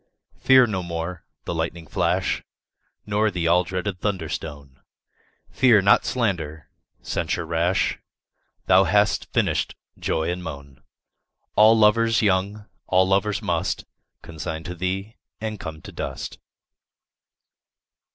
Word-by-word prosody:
Fear 130 Hz, -1 st, +6 dB
no 100 Hz, -5 st, -2 dB
more 85 Hz, 0 st, -5 dB, 0.2 s
the -, -, -3 dB
lightning 80 Hz, 0 st, -3 dB
flash -, -, 0 dB, 0.6 s
Nor 105 Hz, +1 st, +1 dB
the 90 Hz, -4 st, -2 dB
all 90 Hz, +2 st, +4 dB
dreaded 95 Hz, +2 st, -4 dB
thunder 95 Hz, -7 st, -2 dB
stone; 70 Hz, -5 st, -7 dB, 0.7 s
Fear 115 Hz, -6 st, +5 dB
not 100 Hz, -, +5 dB
slander, 80 Hz, -, -2 dB, 0.3 s
censure 85 Hz, -, -2 dB
rash; 85 Hz, +3 st, 0 dB, 0.7 s
Thou 95 Hz, +1 st, +5 dB
hast 105 Hz, +4 st, +2 dB
finished -, -, 0 dB, 0.2 s
joy 80 Hz, +1 st, -1 dB
and 90 Hz, 0 st, -5 dB
moan: 70 Hz, -5 st, -9 dB, 0.7 s
All 110 Hz, +1 st, +7 dB
lovers 115 Hz, +2 st, +4 dB
young, 100 Hz, +1 st, 0 dB, 0.2 s
all 95 Hz, 0 st, +3 dB
lovers 100 Hz, +1 st, +1 dB
must -, -, -1 dB, 0.4 s
Consign 80 Hz, 0 st, -6 dB
to 90 Hz, -, -5 dB
thee, 95 Hz, +4 st, -4 dB, 0.2 s
and 110 Hz, -2 st, -4 dB
come 80 Hz, -2 st, -7 dB
to -, -, -9 dB
dust. -, -, -6 dB
90 Hz, 120 wpm, -23 LUFS, 80-105 Hz, 0.7 s, All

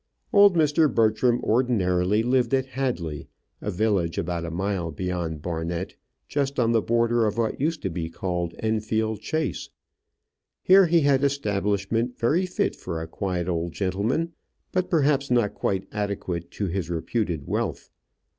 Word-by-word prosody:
Old 200 Hz, -2 st, +7 dB
Mr. 155 Hz, -1 st, +3 dB
Bertram 115 Hz, +2 st, +2 dB
ordinarily 105 Hz, -4 st, +2 dB
lived 125 Hz, +1 st, +2 dB
at 130 Hz, -1 st, 0 dB
Hadley, 125 Hz, -, -3 dB, 0.3 s
a -, -, -3 dB
village 95 Hz, -4 st, 0 dB
about 85 Hz, 0 st, -2 dB
a -, -, -4 dB
mile 90 Hz, 0 st, -2 dB
beyond 85 Hz, -1 st, -3 dB
Barnet, 85 Hz, +1 st, -3 dB, 0.3 s
just 140 Hz, -2 st, -1 dB
on 115 Hz, -1 st, +3 dB
the 115 Hz, -1 st, +3 dB
border 115 Hz, 0 st, +2 dB
of 105 Hz, +1 st, -2 dB
what 115 Hz, +2 st, -1 dB
used 160 Hz, +2 st, -1 dB
to 95 Hz, -, 0 dB
be 80 Hz, -1 st, -3 dB
called 85 Hz, -1 st, -3 dB
Enfield 110 Hz, 0 st, -1 dB
Chase. 155 Hz, +5 st, -2 dB, 0.9 s
Here 190 Hz, 0 st, +7 dB
he 165 Hz, 0 st, +4 dB
had 140 Hz, -2 st, +4 dB
an 140 Hz, -, +3 dB
establishment 105 Hz, -2 st, -1 dB
very 165 Hz, +11 st, +1 dB
fit 180 Hz, -, -1 dB
for 85 Hz, -3 st, -5 dB
a 80 Hz, -, -4 dB
quiet 90 Hz, 0 st, -3 dB
old 85 Hz, -1 st, -2 dB
gentleman, 105 Hz, -, -1 dB, 0.4 s
but 185 Hz, -1 st, 0 dB
perhaps 145 Hz, -4 st, +2 dB
not 120 Hz, -4 st, +2 dB
quite 95 Hz, -1 st, -2 dB
adequate 100 Hz, -5 st, -3 dB
to 100 Hz, -, -3 dB
his 90 Hz, -2 st, -3 dB
reputed 85 Hz, -2 st, -2 dB
wealth. -, -, -3 dB
110 Hz, 155 wpm, -25 LUFS, 90-130 Hz, 0.9 s, Old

